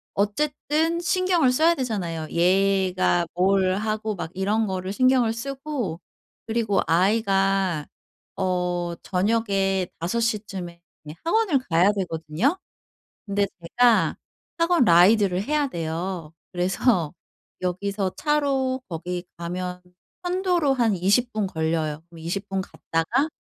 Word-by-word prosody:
어쨌든 300 +9 0
신경을 350 -5 +2
써야 320 +6 +4
되잖아요. 190 - -3
얘가 185 -1 +2
뭘 185 +1 +3
하고 215 +1 -2
막 170 -2 -6
이런 205 +4 0
거를 190 -1 -3
신경을 255 0 +3
쓰고 265 - -4 0.5
그리고 220 -3 +1
아이가 195 -3 +2 0.5
어 180 -2 -1
저녁에 195 -2 0
5 180 +8 -1
시쯤에 195 -6 -3 0.4
학원을 360 -4 +2
가야 175 +4 +4
되거든요. 185 - -1 0.7
근데 200 0 +1 0.2
제가 235 +7 +3 0.4
학원 335 -3 +3
라이드를 185 +2 +5
해야 295 +4 0
돼요. 165 -2 -4 0.2
그래서 180 - +1 0.5
여기서 190 +1 -2
차로 275 -3 0
거기 175 +1 -4
가면 180 +1 -5 0.4
편도로 355 -4 +1
한 230 -5 +2
20 200 +7 +2
분 215 -2 -1
걸려요. 160 -3 -2
그럼 170 -1 -14
20 190 +5 -4
분 195 -1 -1
갔다가 215 - -1
195 Hz, 230 characters per minute, -24 LUFS, 180-245 Hz, 0.7 s, 라이드를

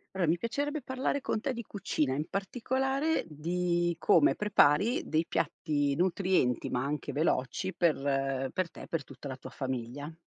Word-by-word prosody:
Allora 175 -4 +1
mi 170 - +3
piacerebbe 285 - -2
parlare 260 +2 -1
con 220 - -1
te 260 +4 -2
di 235 - -4
cucina, 155 -10 -1
in 150 - -1
particolare 265 - 0
di 175 +2 0
come 300 - +4
prepari 210 - +3
dei 160 +1 +1
piatti 145 -4 0
nutrienti, 180 -6 +1
ma 125 - 0
anche 145 0 -3
veloci 155 +4 0
per 135 -5 +1
per 185 -2 -1
te, - - -11
per 165 -4 -2
tutta 140 - -9
la 130 - -5
tua 130 - -9
famiglia. 130 +3 -4
170 Hz, 160 wpm, -30 LUFS, 140-210 Hz, -, come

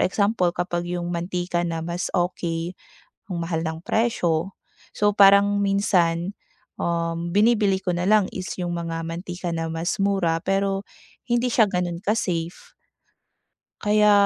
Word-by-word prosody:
example 200 -1 +2
kapag 175 0 -2
yung 175 0 -3
mantika 175 0 -2
na 165 -1 -3
mas 175 +1 -3
okey, 175 -1 -1 0.6
ang 175 -3 -3
mahal 165 -1 -2
ng 160 +1 -4
presyo. 185 -6 0 0.4
So 205 0 +2
parang 200 0 +6
minsan, 185 -2 +1 0.4
um, 170 0 -2
binibili 205 -2 +3
ko - - -3
na 175 - -1
lang 210 -1 +4
is 185 0 -5
yung 175 -1 -2
mga 165 -1 -3
mantika 175 +1 -5
na 165 -1 -2
mas 165 +1 -2
mura 195 -5 +1
pero, 195 0 0 0.4
hindi 240 0 +1
siya 230 -2 +4
gano'n 180 -3 -2
ka-safe. 175 -5 -2 1.1
Kaya 210 0 +4
180 Hz, 135 wpm, -24 LUFS, 170-200 Hz, 1.1 s, parang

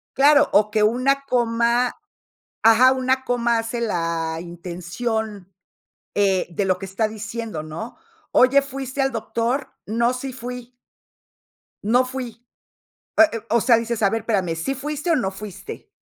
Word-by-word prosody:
Claro, 290 +2 +5
o 210 +1 +4
que 215 -1 +2
una 255 +5 +2
coma, 235 0 +1 0.7
ajá, 225 +4 +7
una 260 0 0
coma 235 -2 +1
hace 230 +1 -3
la 165 -6 -1
intención, 180 +4 -5 0.6
eh, 195 -3 +2
de 185 +4 -1
lo 185 -1 +1
que 195 - -6
está 200 +3 -1
diciendo, 215 -4 -5
¿no? 160 +10 -7 0.4
Oye, 270 +2 +5
¿fuiste 275 0 -4
al 270 0 +1
doctor? 235 +4 -2
No, 235 +3 +1
sí 260 +1 -5
fui 250 0 -8 1.1
no 245 +5 +3
fui. 250 -3 -7 0.8
Eh - - +10
eh, 230 - -3
o 235 +1 +4
sea, 235 +1 +5
dices, 230 0 -2
a 200 - +4
ver, 225 -1 -1
espérame, 190 -7 0
¿sí 215 +12 -2
fuiste 295 +4 -4
o 330 - +4
no 195 -9 0
fuiste? 210 - -9
230 Hz, 150 wpm, -22 LUFS, 205-255 Hz, 1.1 s, Eh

